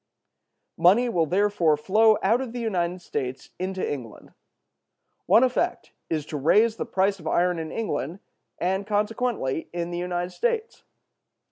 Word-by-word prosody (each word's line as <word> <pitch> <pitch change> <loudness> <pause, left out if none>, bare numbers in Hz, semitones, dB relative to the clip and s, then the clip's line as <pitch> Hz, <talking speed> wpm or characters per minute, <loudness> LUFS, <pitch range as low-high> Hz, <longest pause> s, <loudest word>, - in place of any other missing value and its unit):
Money 195 +9 +5
will 170 -7 +1
therefore 180 -4 +2
flow 215 +7 +4
out 225 +6 +3
of 250 -3 -5
the 245 - -4
United 180 -5 -2
States 130 -4 -5
into 185 0 -2
England. 125 -7 -7 0.9
One 230 - +6
effect 255 -1 0 0.2
is 155 -3 -1
to 155 - -5
raise 215 +10 +3
the - - -4
price 195 +1 +1
of 160 - -8
iron 175 0 +1
in 160 -1 -5
England, 185 - -3 0.4
and 190 +3 -1
consequently 210 - -1
in 175 0 -4
the 175 - -3
United 175 0 -2
States. 465 - -2
185 Hz, 145 wpm, -25 LUFS, 170-220 Hz, 0.9 s, One